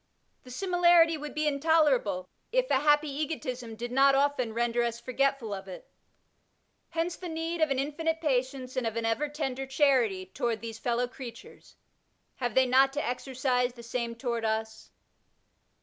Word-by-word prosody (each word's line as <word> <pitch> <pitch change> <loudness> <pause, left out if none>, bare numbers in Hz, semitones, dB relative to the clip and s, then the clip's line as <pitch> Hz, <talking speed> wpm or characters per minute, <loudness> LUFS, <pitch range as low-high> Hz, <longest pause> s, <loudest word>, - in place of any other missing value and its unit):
The 255 - -15
simi 355 +7 -2
larity 335 -2 +6
would 300 0 -7
be 305 0 0
intolerable, 280 - +2 0.2
if - - +1
a 265 - +4
happy 295 +1 +3
egotism 270 -5 -4
did 240 +2 -5
not 270 +1 +5
often 275 -4 +1
render 235 +1 0
us 235 0 -1
forgetful 260 -3 -1
of 195 0 -7
it. 185 - -10 1.0
Hence 335 +1 -2
the 360 - -7
need 325 +1 -3
of 315 - +4
an 270 - 0
infinite 320 +4 -1
patience 260 -3 -1
and 255 -3 0
of 225 - -3
an 230 0 -2
ever 250 +7 0
tender 270 -3 -3
charity 260 -9 +2
toward 220 +4 -2
these 225 -1 -7
fellow 240 +1 0
creatures; 245 -1 -11 0.6
have 245 -4 -2
they 260 - +5
not 265 +2 +4
to 295 - -2
exercise 250 0 -1
the 235 -1 -12
same 235 0 -3
toward 235 -1 -3
us 220 0 -3
260 Hz, 165 wpm, -29 LUFS, 235-295 Hz, 1.0 s, larity